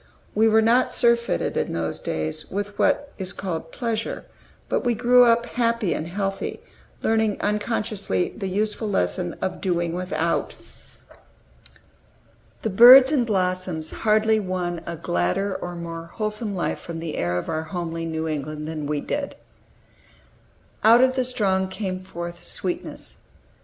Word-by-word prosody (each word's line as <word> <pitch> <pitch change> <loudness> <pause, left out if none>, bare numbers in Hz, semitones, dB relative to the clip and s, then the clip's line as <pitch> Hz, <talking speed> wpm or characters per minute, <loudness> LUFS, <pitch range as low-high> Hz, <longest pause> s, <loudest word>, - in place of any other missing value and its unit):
We 220 +2 +4
were 220 0 +4
not 240 +3 +3
surfeited, 235 0 +2
in - - -1
those 85 -1 -3
days, 80 0 -3
with 205 +1 -4
what 285 0 +1
is 185 -1 -2
called 165 -4 -5
pleasure; 230 -3 -3 0.4
but - - 0
we 240 -2 +1
grew 245 +2 +6
up 235 0 +3
happy 230 -5 0
and 155 - -4
healthy, 195 +2 -3 0.4
learning 220 -2 +2
unconsciously 210 - -1
the 195 - -4
useful 210 +2 -1
lesson 90 - -1
of 190 - -3
doing 175 -3 0
without. 170 -2 -1 2.1
The 220 - -1
birds 255 +6 +9
and 255 -6 +2
blossoms 185 -5 -1
hardly 220 0 +2
won 180 -3 -3
a 170 -1 -4
gladder 120 - 0
or 175 -1 -5
more 165 -1 -6
wholesome 215 -1 -3
life 175 - -2
from 170 -1 -7
the 165 -2 -5
air 90 +1 -1
of 90 - -4
our 155 - -1
homely 165 0 -4
New 160 0 -3
England 150 0 -4
than 155 -2 -4
we 150 -1 -1
did. 285 -1 -3 1.5
"Out 230 +3 +7
of 260 0 +3
the 260 0 0
strong 195 -6 +1
came 190 -1 -4
forth 175 -2 -8
sweetness." 180 -2 -4
190 Hz, 145 wpm, -24 LUFS, 165-220 Hz, 2.1 s, birds